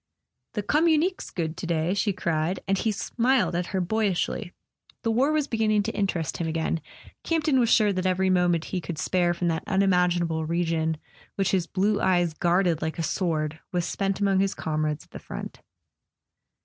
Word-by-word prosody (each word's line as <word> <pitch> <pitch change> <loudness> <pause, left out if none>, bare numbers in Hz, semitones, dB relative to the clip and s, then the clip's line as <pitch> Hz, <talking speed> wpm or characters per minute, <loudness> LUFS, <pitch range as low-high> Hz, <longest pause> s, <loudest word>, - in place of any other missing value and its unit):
"The 210 - -1
communique's 320 - +2
good 160 -2 -3
to 175 - -5
day," 170 +1 +1
she 205 +1 +1
cried;, 170 0 -1
and 195 - +2
he 220 +3 0
smiled 245 +3 +1
at 175 +1 -1
her 190 - -1
boyishly. 185 -2 -1 0.5
The 230 - +1
war 260 +6 +3
was 305 -2 +1
beginning 215 -3 +1
to 225 - -2
interest 195 -7 -1
him 170 - -2
again: 160 0 -1 0.4
Campton 310 -5 +2
was 235 -2 +3
sure 210 -3 +4
that 185 0 -1
every 185 +1 +2
mo¬ 180 -1 +3
ment 170 -1 0
he 185 - -3
could 165 0 -5
spare 175 +2 +1
from 175 0 -1
that 160 -1 -1
unimaginable 180 -4 +2
region 160 -1 0 0.4
which 195 -1 +1
his 180 -3 +1
blue 200 +3 +1
eyes 175 -3 +2
guarded 175 0 +1
like 160 0 -3
a 165 - -1
sword 160 -3 -1
was 175 -2 0
spent 195 -1 -1
among 195 -2 +2
his 195 0 +1
comrades 155 -1 -2
at - - -34
the - - -8
front. - - -8
185 Hz, 185 wpm, -26 LUFS, 165-205 Hz, 0.5 s, sure